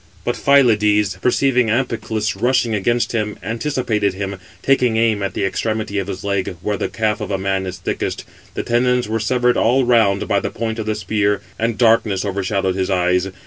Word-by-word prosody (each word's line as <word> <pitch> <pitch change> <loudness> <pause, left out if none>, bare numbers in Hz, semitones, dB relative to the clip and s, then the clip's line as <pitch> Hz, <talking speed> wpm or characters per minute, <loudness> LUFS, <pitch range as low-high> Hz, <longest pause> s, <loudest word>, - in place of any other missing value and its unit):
But - - 0
Phylides, 105 -7 +3
perceiving 125 -1 +2
Amphiclus 110 -3 -1
rushing 125 -2 +1
against 120 +4 0
him, 105 -2 -2
anticipated 110 -3 -1
him, 100 0 -4 0.3
taking 125 -4 +2
aim 110 -2 +2
at 100 - -3
the - - 0
extremity 110 0 -2
of 95 - -4
his 95 -2 -6
leg, 100 -2 -2
where 105 - 0
the - - -3
calf 110 -1 -1
of 105 - -4
a 100 - 0
man 95 0 -1
is 90 -1 -5
thickest; - - -3 0.3
the - - -2
tendons 125 0 +1
were 110 +1 -1
severed 125 +2 +1
all 125 +3 +3
round 110 -5 +3
518 - - -4
by 100 - +2
the - - -3
point 115 0 -4
of 110 - -4
the 110 - 0
spear, 105 -1 0 0.2
and 115 -1 -1
darkness 110 -4 +2
overshadowed 95 -1 -1
his 95 0 -2
eyes. 90 0 +1
110 Hz, 190 wpm, -19 LUFS, 100-120 Hz, 0.3 s, Phylides